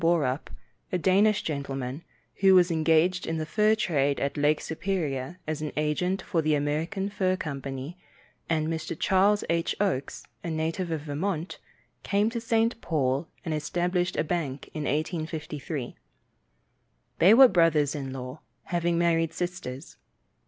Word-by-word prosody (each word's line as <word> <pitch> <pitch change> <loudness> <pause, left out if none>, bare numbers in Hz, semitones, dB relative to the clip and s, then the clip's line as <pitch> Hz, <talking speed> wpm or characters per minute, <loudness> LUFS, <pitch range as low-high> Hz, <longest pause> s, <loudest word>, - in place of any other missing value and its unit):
Borup, 155 -5 +1 0.4
a 180 - +1
Danish 195 +4 +3
gentleman, 140 -1 -4 0.3
who 195 -1 +6
was 180 -1 +5
engaged 165 +3 +2
in 165 - -1
the 155 - -2
fur 215 +6 +3
trade 145 -9 +1
at 140 - -1
Lake 150 +1 +2
Superior 160 -4 -3
as 155 -1 -3
an 150 - -3
agent 180 +5 0
for 165 - 0
the 155 -1 +2
American 160 +7 -1
Fur 190 -2 0
Company, 140 0 -6 0.5
and 155 -2 +1
Mr. 160 -1 -3
Charles 200 +2 +3
H. 170 0 0
Oakes, 175 -10 -1 0.2
a 170 - -3
native 165 +3 -2
of 160 -2 -2
Vermont, 160 +4 -3 0.4
came 205 +2 +1
to 235 -1 -3
St. 230 0 +1
Paul, 140 -1 0 0.2
and 160 - -1
established 175 +4 -1
a - - +1
bank 155 -5 -3
in 155 -2 -3
1853. 155 -3 -3 1.2
They 190 +5 +7
were 265 +1 +10
brothers 165 - +3
in 135 -3 -5
law, 130 +2 -7 0.2
having 175 -1 0
married 165 -1 +2
sisters. 175 -6 -5
165 Hz, 145 wpm, -27 LUFS, 145-185 Hz, 1.2 s, were